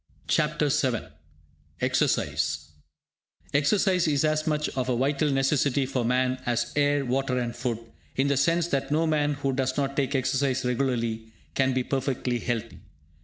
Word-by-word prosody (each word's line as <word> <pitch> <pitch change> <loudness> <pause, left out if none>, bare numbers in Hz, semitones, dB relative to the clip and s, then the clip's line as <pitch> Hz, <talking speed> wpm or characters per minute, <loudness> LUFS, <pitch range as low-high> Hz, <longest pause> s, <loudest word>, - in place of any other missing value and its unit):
CHAPTER - - +1
VII - - 0 0.7
EXERCISE 75 +2 0 0.8
Exercise 180 +5 +3
is 145 -1 +2
as 155 +1 0
much 150 -1 +1
of 130 -1 -2
a 125 - +2
vital 140 +3 +1
necessity 135 0 +2
for 130 -2 -1
man 130 +2 +1
as 120 -1 0
air, 145 -1 +2
water 130 +1 0
and 120 -1 -2
food, 120 -4 -2 0.4
in 135 +1 +2
the 140 - +2
sense 165 +5 +2
that 135 -3 -1
no 160 +2 +2
man 150 -2 +1
who 140 -1 -1
does 130 0 -1
not 140 -1 -1
take 140 0 0
exercise 135 0 0
regularly, 115 -3 -1 0.2
can 135 -1 +2
be 130 0 0
perfectly 130 -2 -1
healthy. 115 -1 -3
135 Hz, 155 wpm, -26 LUFS, 125-145 Hz, 0.8 s, Exercise